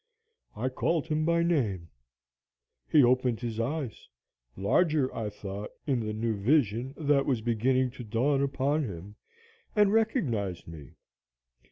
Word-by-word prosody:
I 120 +5 -1
called 160 +4 0
him 155 -1 0
by 170 0 +2
name. 105 - 0 1.0
He 150 -3 +6
opened 125 -1 +2
his 115 -2 -4
eyes 135 0 -3 0.5
larger, 140 - +2
I 110 -2 -2
thought, 100 0 -7 0.2
in 135 -4 +1
the 110 -2 -3
new 110 +1 -1
vision 125 +2 +1
that 145 -3 +2
was 125 -5 +1
beginning 125 +3 +1
to 125 -1 -9
dawn 125 +6 +1
upon 140 +2 0
him 100 -2 -7 0.6
and 210 -1 +4
recognized 125 - 0
me. 75 -5 -11
125 Hz, 135 wpm, -29 LUFS, 110-150 Hz, 1.0 s, He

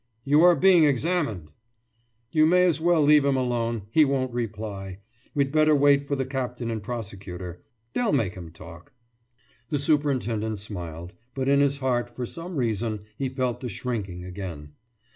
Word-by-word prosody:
»You 145 +3 +4
are 175 0 +7
being 185 -3 +5
examined!« 140 - 0 0.8
»You 155 0 +4
may 180 +2 +5
as 170 -4 +2
well 170 -2 +3
leave 150 0 +6
him 140 -1 +2
alone. 120 -3 -1
He 155 - +6
won't 135 -3 0
reply. 105 -5 -5 0.4
We'd 140 -1 +1
better 155 0 +4
wait 140 0 +4
for 140 - 0
the 135 -1 -2
captain 125 -3 -3
and 110 -1 -3
prosecutor. 95 -6 -7 0.3
They'll 240 -4 +1
make 95 -5 +1
him 85 -3 -9
talk.« 85 +3 -13 0.8
The 150 - 0
superintendent 125 -8 0
smiled, 90 -3 -7 0.2
but 135 -1 -2
in 140 0 +4
his 140 0 +2
heart 120 -3 -1
for 125 - -3
some 170 +7 -7
reason 110 -4 -1
he 135 +3 -2
felt 130 -2 -2
the 125 - -5
shrinking 100 -5 -4
again. 90 -6 -7
125 Hz, 160 wpm, -25 LUFS, 100-145 Hz, 0.8 s, are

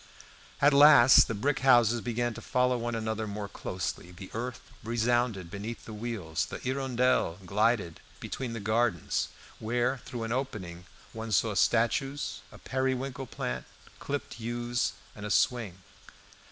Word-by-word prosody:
At 145 +1 +6
last 140 -3 +8
the 115 - -3
brick 135 +7 0
houses 120 -3 +5
began 120 0 -1
to - - -9
follow 125 0 +1
one 120 -1 -2
another 110 -1 -2
more 105 0 -5
closely, 90 -3 -5
the 90 +1 -11
earth 120 +2 -4 0.2
resounded 115 -5 0
beneath 105 +4 -6
the 110 - -8
wheels, 105 -8 -3
the - - -6
"Hirondelle" 130 -8 0
glided 105 -3 +1 0.2
between 125 -3 -5
the 115 - -4
gardens, 110 -4 0 0.3
where 120 +4 0
through 120 -2 -6
an 115 - -4
opening 95 -9 -4 0.3
one 110 0 -6
saw 105 +2 +2
statues, 115 +2 +1
a - - -12
periwinkle 130 0 -2
plant, 65 - -4 0.3
clipped 140 -3 -5
yews, 120 -1 -1 0.2
and 105 - -9
a 105 - -4
swing. 110 -5 +1
115 Hz, 140 wpm, -29 LUFS, 105-125 Hz, 0.3 s, last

